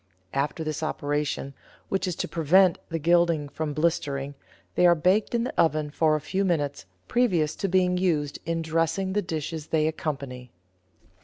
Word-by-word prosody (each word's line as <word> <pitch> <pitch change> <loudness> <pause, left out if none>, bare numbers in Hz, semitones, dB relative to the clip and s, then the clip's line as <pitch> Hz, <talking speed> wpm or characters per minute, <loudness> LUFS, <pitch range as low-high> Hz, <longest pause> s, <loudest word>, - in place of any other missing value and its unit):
After 145 +4 -1
this 155 -1 -3
operation, 145 -2 -2 0.4
which 190 -1 0
is 180 - -2
to - - -3
prevent 175 +3 +4
the 165 - -2
gilding 170 -2 +2
from 150 +1 -4
blistering, 145 -4 -1 0.4
they 180 - +5
are 175 - +6
baked 185 +8 +2
in 235 - +1
the 250 - -3
oven 155 -2 +1
for 155 0 +2
a - - 0
few 185 +6 -1
minutes 145 - -1 0.2
previous 180 -11 +1
to 195 - -1
being 180 -1 +2
used 155 -6 0
in 165 0 -2
dressing 165 +4 0
the 210 - +1
dishes 160 -3 -4
they 155 -1 +1
accompany. 140 -5 -4
160 Hz, 165 wpm, -26 LUFS, 150-180 Hz, 0.4 s, are